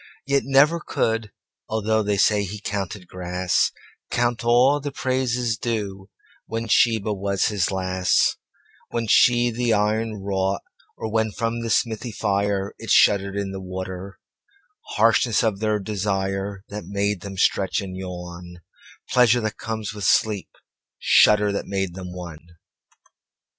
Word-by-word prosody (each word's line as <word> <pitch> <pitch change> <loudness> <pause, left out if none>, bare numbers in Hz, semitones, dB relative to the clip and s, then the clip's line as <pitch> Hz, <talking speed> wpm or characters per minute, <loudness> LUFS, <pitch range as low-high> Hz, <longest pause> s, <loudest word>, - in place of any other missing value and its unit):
Yet 140 0 +2
never 140 +5 +4
could, 115 -7 -1 0.4
althoughThey 110 -2 0
say 105 0 +3
he 100 +2 -6
counted 100 -2 -4
grass, 90 0 0 0.4
Count 120 -1 0
all 125 +5 +4
the 145 0 -5
praises 125 -4 -1
dueWhen 105 +1 -5
Sheba 110 -1 +3
was 100 -1 0
his 100 -4 0
lass, 95 -1 +1 0.5
When 115 -1 -2
she 120 +2 +4
the 120 0 0
iron 110 +1 0
wrought, 95 -1 -1 0.4
orWhen 110 0 -1
from 115 0 -2
the 115 - -3
smithy 115 +2 0
fireIt 100 -1 -2
shuddered 100 -1 +4
in 100 -1 -2
the 95 0 -6
water:Harshness 100 - -2
of 110 -4 0
their 110 -1 0
desireThat 100 0 -3
made 100 -1 -1
them 95 0 -8
stretch 95 +1 +1
and 95 -3 -6
yawn, 90 -1 -8 0.5
Pleasure 125 -1 +4
that 110 -1 -3
comes 110 -2 -4
with 105 -1 -7
sleep, 105 -1 +2 0.5
Shudder 105 -1 +5
that 100 - -3
made 95 -2 -2
them 90 -1 -7
one. 90 -3 -8
105 Hz, 125 wpm, -23 LUFS, 95-115 Hz, 0.5 s, Shudder